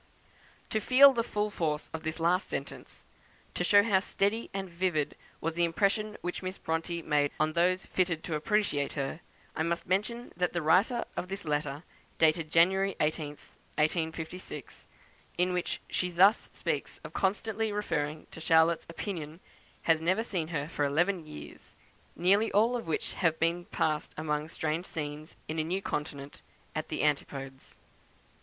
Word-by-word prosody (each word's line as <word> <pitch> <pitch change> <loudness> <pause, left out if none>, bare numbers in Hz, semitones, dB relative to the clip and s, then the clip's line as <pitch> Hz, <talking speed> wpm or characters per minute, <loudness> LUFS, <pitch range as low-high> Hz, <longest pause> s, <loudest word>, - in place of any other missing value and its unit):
To 220 - +2
feel 270 +5 +8
the 235 - +1
full 210 -2 -1
force 155 -5 -2
of 160 - -4
this 160 +1 -4
last 175 +3 +2
sentence - - -6 0.5
to - - -1
show 205 0 +6
how 200 -3 +4
steady 205 +3 0
and 195 -1 -3
vivid 170 -4 -1 0.2
was 165 +1 -1
the 170 +1 +1
impression 205 +5 +1
which 180 0 -3
Miss 185 +1 -4
Bronte 165 +1 -2
made 145 -1 +2
on 155 +1 +2
those 180 +2 +2
fitted 175 -4 0
to 165 - -4
appreciate 150 -3 +1
her 140 +2 -3 0.4
I - - -1
must 170 +1 -1
mention 210 +6 -1
that 180 0 0
the 175 - 0
writer 195 +10 +3
of 180 - -3
this 195 0 -6
letter, 150 0 -1 0.3
dated 160 0 +3
January 190 +4 +4
18th, 150 -1 -2 0.2
1856, 160 +3 -3 0.5
in 180 +1 +2
which 180 -1 -1
she 180 - -1
thus 190 +5 +5
speaks - - -3
of - - -9
constantly 215 +2 0
referring 155 -7 -2
to - - -9
Charlotte's 160 +1 +4
opinion 165 -3 -5 0.4
has 160 -1 +3
never 185 +7 +2
seen 180 -8 -2
her 150 -3 -2
for 150 -2 -2
eleven 165 +4 +1
years, 75 - -11 0.4
nearly 200 +5 +3
all 225 +4 +4
of 235 -7 -4
which 160 - -1
have 165 -3 +1
been 170 +1 0
passed 155 -1 -1
among 150 -1 -1
strange 160 +2 -2
scenes, 150 -1 -6
in 160 +1 -2
a - - +2
new 180 +4 -1
continent, 145 -5 -5 0.3
at - - -2
the - - -1
antipodes. 135 -2 -2
170 Hz, 160 wpm, -30 LUFS, 155-195 Hz, 0.5 s, feel